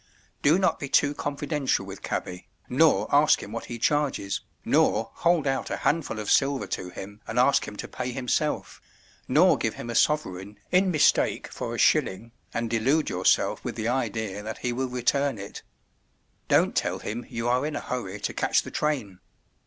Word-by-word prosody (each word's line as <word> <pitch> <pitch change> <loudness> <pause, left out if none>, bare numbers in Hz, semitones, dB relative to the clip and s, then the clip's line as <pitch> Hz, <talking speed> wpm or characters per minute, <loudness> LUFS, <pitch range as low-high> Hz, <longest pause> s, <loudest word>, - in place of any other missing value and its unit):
Do 150 +5 +5
not 185 -4 +1
be 140 - -5
too 145 +2 +3
confidential 145 -6 -1
with 95 0 -9
cabby, 90 0 -4 0.2
nor 155 +5 +3
ask 145 +2 +5
him 105 - -9
what 115 +1 -5
he 120 - -6
charges, 135 -6 0 0.2
nor - - +2
hold 170 -3 +2
out 135 -1 -1
a - - -2
handful 150 -8 0
of 105 -1 -2
silver 140 -1 +2
to 90 - -4
him 100 +4 -9
and 110 - -5
ask 130 +3 +4
him 105 - -7
to - - -5
pay 125 0 -4
himself, 125 -1 -2 0.5
nor - - +4
give - - -1
him 120 - -6
a - - -4
sovereign 105 -10 0
in 185 +1 +4
mistake 155 -5 +2
for - - -5
a - - -5
shilling, 115 +5 +2 0.2
and 115 0 -2
delude 130 +7 +1
yourself 90 0 +2
with - - -4
the 110 +1 -2
idea 110 -5 -2
that 110 +1 -6
he 125 - -2
will 130 +1 -2
return 130 +1 0
it. 100 0 -8 0.9
Don't - - +3
tell - - 0
him 115 +3 -5
you 115 +1 -3
are 125 +2 +2
in 150 +1 -3
a - - -1
hurry 105 -6 -5
to - - -2
catch - - +1
the - - -9
train. 130 -12 -2
125 Hz, 185 wpm, -26 LUFS, 105-145 Hz, 0.9 s, Do